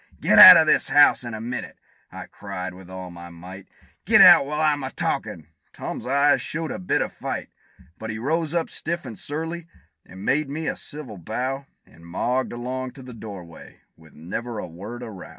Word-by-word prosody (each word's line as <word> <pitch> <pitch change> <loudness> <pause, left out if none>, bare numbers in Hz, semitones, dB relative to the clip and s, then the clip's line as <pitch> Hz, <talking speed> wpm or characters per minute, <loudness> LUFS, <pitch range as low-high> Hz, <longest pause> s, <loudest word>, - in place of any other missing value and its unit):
"Get - - +4
out - - +13
of - - +4
this - - +2
house 145 -2 +5
in 120 -2 -6
a - - -7
minute!" 120 +3 -6 0.3
I - - -9
cried, 90 0 -7
with 90 0 -14
all 95 -1 -8
my 85 0 -11
might: 90 +3 -12 0.4
"Get - - +5
out, 140 - +8
while 150 +1 -3
I'm 150 -2 +1
a 130 - -4
talkin'!" 80 - -4 0.3
Tom's - - -7
eyes 140 +2 +3
showed 160 0 -4
a - - -5
bit 180 - 0
of - - -8
fight; - - -6 0.5
But 110 - -7
he 110 - -4
rose 155 +6 -2
up, 170 -1 -1
stiff 170 -1 -5
and 120 - -7
surly, 160 +6 -5 0.4
and 95 +3 -12
made 145 +1 0
me 155 +3 -5
a - - -2
civil 130 -10 -9
bow, 130 +9 -4 0.2
And 85 - -20
mogged 125 +9 -2
along 125 +2 -5
to 135 - -12
the 125 -1 -11
door 105 -5 -9
way, 85 -1 -15
with 80 -1 -20
never 110 +9 -6
a 105 - -5
word 100 +8 -9
of 110 - -8
row. 95 - -11
120 Hz, 205 wpm, -23 LUFS, 95-145 Hz, 0.5 s, out